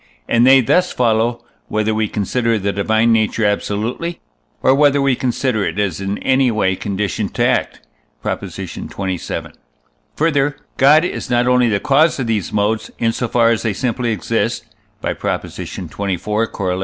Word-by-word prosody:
and 120 +1 +4
they 135 0 +7
thus 180 +10 +2
follow, 115 0 +1 0.2
whether 110 0 0
we 110 0 0
consider 115 +3 0
the 100 0 -1
divine 110 +3 +2
nature 110 0 +1
absolutely, 110 +11 -2 0.4
or 130 - +5
whether 145 0 +4
we 140 -2 +2
consider 125 -3 -1
it - - -3
as 100 -4 -1
in 100 +1 -2
any 130 -1 +2
way 100 -4 +1
conditioned 100 0 -3
to - - +2
act - - 0 0.4
(Prop. - - -2
xxvii.). 95 -2 -5 1.0
Further, 145 -3 +1 0.2
God 150 +5 +6
is - - -4
not 120 0 +2
only 125 -1 +4
the 100 -2 +1
cause 150 +8 +3
of 130 - -1
these 110 -4 -1
modes, 105 +1 0
in 115 -1 +1
so 120 +1 -2
far 115 0 +3
as 115 - 0
they 110 -3 -1
simply 120 +2 -1
exist 105 -7 -1 0.4
(by - - -1
Prop. - - -2
xxiv, - - -7
Coroll.) 100 -1 -2
115 Hz, 165 wpm, -18 LUFS, 105-130 Hz, 1.0 s, they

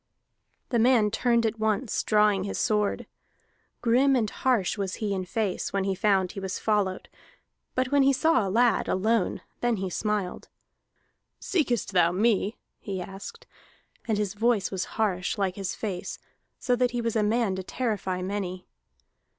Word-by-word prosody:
That 235 -3 +2
man 230 -4 +4
turned 235 +1 +2
at 225 0 -1
once, 220 +2 0
drawing 210 -3 +3
his 200 - -4
sword. 210 -1 0 0.8
Grim 260 +4 +4
and 230 -4 +1
harsh 245 -8 +1
was 195 -3 -3
he 210 -2 -2
in 185 -1 -2
face 200 0 -2
when 195 -1 0
he 195 0 0
found 190 -2 +2
he 200 - -7
was 190 -1 -3
followed, 205 -4 0 0.7
but 255 0 0
when 285 -1 +4
he 275 0 +5
saw 315 -1 +3
a 195 - -2
lad, 235 +4 +3
alone, 215 +1 +1 0.2
then 240 -1 +1
he 190 -1 -3
smiled. 210 -2 -2 0.9
"Seekest 275 - 0
thou 175 -3 +4
me?" 210 +2 +1 0.2
he 195 -3 -5
asked. 195 - -8 0.6
And 220 -2 +1
his 205 -2 -1
voice 220 -1 +1
was 190 -2 -2
harsh, 195 -3 0
like 190 -2 0
his 195 -2 -4
face, 190 -5 -4 0.4
so 250 - +1
that 250 0 +2
he 240 0 -3
was 230 -1 -2
a 220 - +3
man 210 -1 +1
to - - -3
terrify 190 -4 -2
many. 185 -2 -4
210 Hz, 165 wpm, -27 LUFS, 190-235 Hz, 0.9 s, he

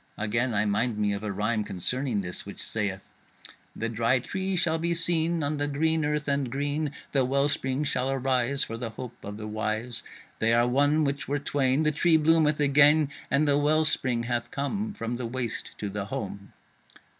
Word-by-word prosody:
Again 115 +3 0
I 100 +1 +2
mind 105 +2 0
me 105 -1 +1
of 100 - -3
a 105 -1 -3
rhyme 105 +2 0
concerning 110 +4 0
this 90 -2 -5
which 100 - -10
sayeth: 100 -3 -2 0.7
The 115 - -2
Dry 115 +3 +2
Tree 190 +9 -3
shall 165 -2 +1
be 170 +1 0
seen 165 -1 +2
On 145 +1 -1
the 145 0 0
green 160 +2 +1
earth, 150 0 -1
and 140 -2 0
green 145 +2 -1 0.2
The 135 -2 +2
Well 140 +2 +2
spring 135 -1 0
shall 130 -2 0
arise 135 0 +1
For 115 - -5
the 115 -1 -4
hope 120 +2 -9
of 105 +1 -7
the 110 - -7
wise. 110 +2 -2 0.4
They 115 +1 +3
are 120 +1 +3
one 145 +5 +3
which 140 -1 -2
were 145 - 0
twain, 140 0 +1
The 155 - +3
Tree 160 +2 +3
bloometh 155 -1 +3
again, 145 +1 +5 0.2
And 150 +2 +2
the 145 0 +3
Well 155 +2 +3
spring 125 -6 +1
hath 120 0 -2
come 200 - -3
From 115 +1 -4
the 120 -1 -4
waste 120 -1 -3
to 105 - -4
the 100 0 -4
home. 100 -4 -6
130 Hz, 195 wpm, -27 LUFS, 115-150 Hz, 0.7 s, again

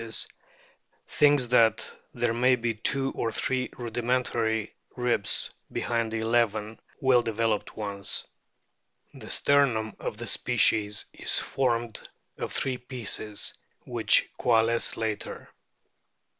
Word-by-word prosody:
DOLPHINS 115 -1 -2 0.9
271 125 -6 +4 0.2
there 120 -1 +1
may 125 +2 +4
be 120 -1 -1
two 135 +5 0
or 115 - -2
three 130 +2 -1
rudimentary 120 -2 -1 0.2
ribs 125 -5 +2 0.2
behind 115 -2 -1
the 115 - -2
eleven 110 -1 0 0.2
well 130 -2 +5
developed 115 -2 -1
ones. 100 -2 -3 0.9
The - - -11
sternum 125 -7 +2
of 110 - -4
the 120 - -6
species 105 -2 +1
is - - -1
formed 120 -4 -1 0.3
of - - -3
three 130 -2 -2
pieces, 115 -4 -2 0.3
which - - +2
coalesce 115 -1 +2
later. 110 -2 -4
115 Hz, 105 wpm, -27 LUFS, 110-125 Hz, 0.9 s, well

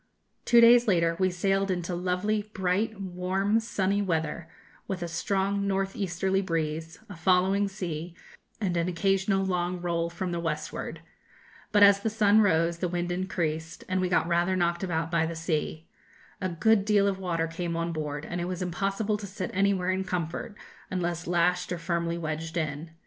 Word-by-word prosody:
Two 235 - +6
days 240 +1 +7
later 170 -4 +3
we 185 0 +3
sailed 195 +2 0
into 180 -1 -2
lovely, 185 +4 -1
bright, 195 +3 0
warm, 190 +3 0
sunny 200 -3 0
weather, 160 -3 -2 0.4
with 185 -3 -3
a - - -3
strong 195 +4 0
north 195 0 -1
easterly 190 0 0
breeze, 160 -2 -2
a 200 - -9
following 190 +4 +3
sea, 175 -4 -5 0.4
and 190 -5 -1
an 170 0 +1
occasional 195 +2 +1
long 180 -1 -1
roll 170 -1 -1
from 175 +1 -4
the 170 - -2
westward. 155 -2 -4 0.7
But 205 -1 +6
as 200 0 +7
the 220 - -1
sun 215 -1 +4
rose, 170 -3 +2
the 180 - 0
wind 175 0 -2
increased, 165 -3 -3
and 185 0 0
we 185 - 0
got 170 -2 +2
rather 175 +2 +2
knocked 175 -1 +1
about 165 -2 -1
by 165 -1 +2
the 165 - -5
sea. 160 -1 -2 0.6
A 185 - 0
good 200 +5 +3
deal 205 -1 +3
of 195 -1 -1
water 170 -3 -1
came 170 +1 -4
on 170 0 -2
board, 150 -1 -4
and 175 0 -4
it - - -1
was 180 0 -3
impossible 195 +4 -1
to 205 -1 -7
sit 185 -1 -5
anywhere 190 -1 +2
in 190 0 -1
comfort, 180 +3 -3 0.3
unless 175 -2 -2
lashed 180 +1 +1
or 175 - -1
firmly 170 0 -1
wedged 160 +1 -4
in. 155 0 -3
180 Hz, 175 wpm, -28 LUFS, 170-195 Hz, 0.7 s, days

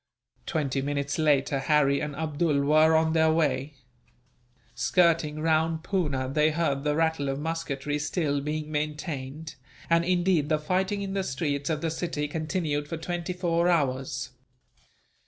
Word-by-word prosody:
Twenty 140 -5 -1
minutes 140 +1 -2
later, 145 -3 +2
Harry 140 -1 +3
and 150 -1 -4
Abdool 155 -1 0
were 155 +2 +5
on 160 0 +3
their 160 -1 +4
way. 145 -3 0 1.0
Skirting 160 +1 +2
round 160 0 +1
Poona, 145 -10 -1
they 150 +3 +2
heard 150 -4 -1
the 150 0 +1
rattle 160 -3 +1
of 135 - -2
musketry 150 -2 -3
still 150 -2 -1
being 150 +1 -4
maintained; 150 -1 -4 0.4
and 170 0 +4
indeed, 175 -4 +1
the 155 - +3
fighting 190 +6 -1
in 195 -1 -4
the 195 -1 0
streets 140 -1 -2
of 155 -2 -1
the 165 -1 -1
city 160 -3 -2
continued 155 -1 -2
for 165 - -4
twenty 175 +1 -4
four 175 -1 +1
hours. 135 -4 0
155 Hz, 145 wpm, -27 LUFS, 145-165 Hz, 1.0 s, were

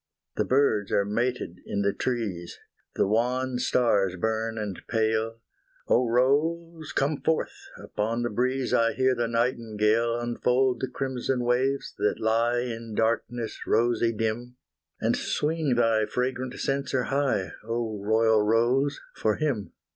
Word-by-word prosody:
The - - 0
birds 125 -7 +2
are 100 - +2
mated 115 -3 -2
in 100 - -2
the 100 0 +1
trees, 105 -9 -3 0.4
The - - +2
wan 125 +4 0
stars 100 -7 +2
burn 110 +3 -1
and 105 -4 -4
pale 110 0 0 0.5
Oh 125 0 +3
Rose, 155 +6 +1
come 140 +2 0
forth! 160 - -1
upon 115 +3 -2
the 120 - -1
breeze 130 +3 0
I 115 0 +3
hear 130 0 +2
the 120 -1 -1
nightingale 115 -1 +1
Unfold 125 +1 +1
the 130 - -2
crimson 130 -1 -2
waves 130 +3 0
that 105 +1 +1
lie 115 +2 +2
In 115 -2 -5
darkness 115 +1 -1
rosy 115 0 +2
dim, 115 +3 -3 0.4
And - - +1
swing 155 -3 0
thy 115 -2 +2
fragrant 130 0 -2
censer 135 -2 -1
high, 135 -9 0
Oh 115 -2 -3
royal 110 +1 +3
Rose 120 +6 +2 0.2
for 110 -1 +1
him! 125 - -2
120 Hz, 135 wpm, -27 LUFS, 110-130 Hz, 0.5 s, Oh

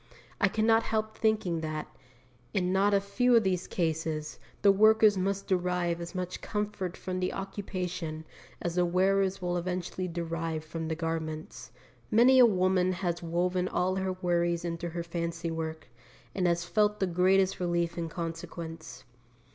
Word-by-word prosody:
I 200 - +4
could 215 +3 0
not 225 0 +5
help 215 -1 -2
thinking 210 -7 +1
that, 155 -1 -4 0.7
in 180 -1 +1
not 195 +2 +3
a 200 - +4
few 200 +5 +2
of 230 - +5
these 185 -2 0
cases, 160 -2 -2 0.2
the 200 - +8
workers 215 +1 +5
must 195 +1 -1
derive 180 -2 0
as 170 +2 -7
much 180 -1 -4
comfort 210 -4 -3
from 185 0 -4
the 185 - 0
occupation 180 -5 -4 0.4
as 175 - -1
the 180 0 +2
wearers 190 +1 +2
will 175 0 0
eventually 180 +1 -3
derive 165 -2 -3
from 160 0 -5
the 160 - -1
garments. 160 -1 -4 0.4
Many 250 +4 +6
a 245 - +9
woman 185 -2 +2
has 175 -2 -2
woven 180 +2 0
all 185 +1 0
her 190 -1 -1
worries 175 -1 0
into 170 0 -3
her 170 +1 -4
fancy 170 0 -3
work, 160 -1 -5 0.5
and 185 -2 +1
has 170 0 +1
felt 210 +4 +1
the 190 - +2
greatest 185 +2 +2
relief 170 -1 0
in 165 -1 -3
consequence. 165 -1 -6
180 Hz, 160 wpm, -29 LUFS, 170-195 Hz, 0.7 s, a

